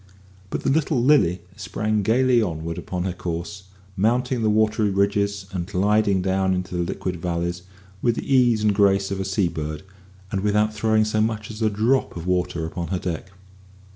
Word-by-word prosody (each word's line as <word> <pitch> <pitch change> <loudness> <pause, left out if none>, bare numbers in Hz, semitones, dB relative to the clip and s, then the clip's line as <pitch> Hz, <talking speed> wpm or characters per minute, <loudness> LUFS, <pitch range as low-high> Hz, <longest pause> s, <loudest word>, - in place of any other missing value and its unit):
But - - -4
the - - +2
little 150 -2 +1
Lily 120 - +3
sprang 105 +1 -1
gaily 120 +3 +3
onward 85 -4 -3
upon 90 -1 -4
her 95 -1 -2
course, 90 +2 -5 0.3
mounting 120 +5 +1
the 110 - +2
watery 110 0 +2
ridges 100 0 0
and 90 -2 -3
gliding 100 0 +2
down 95 0 +1
into 90 0 -4
the 90 - 0
liquid 90 +1 -3
valleys 85 +1 -2 0.4
with 120 -2 +2
the - - -4
ease 120 -4 +4
and 105 -1 +3
grace 100 -1 +3
of 95 - -2
a - - -1
seabird, 85 -5 -2 0.5
and 95 - -1
without 105 +1 +2
throwing 110 0 +2
so 110 0 0
much 110 0 -2
as 110 +1 -9
a 110 - +3
drop 110 +2 +1
of 85 - -6
water 90 -2 0
upon 85 +1 -4
her 95 +3 -1
deck. 90 0 -4
100 Hz, 180 wpm, -23 LUFS, 90-110 Hz, 0.5 s, ease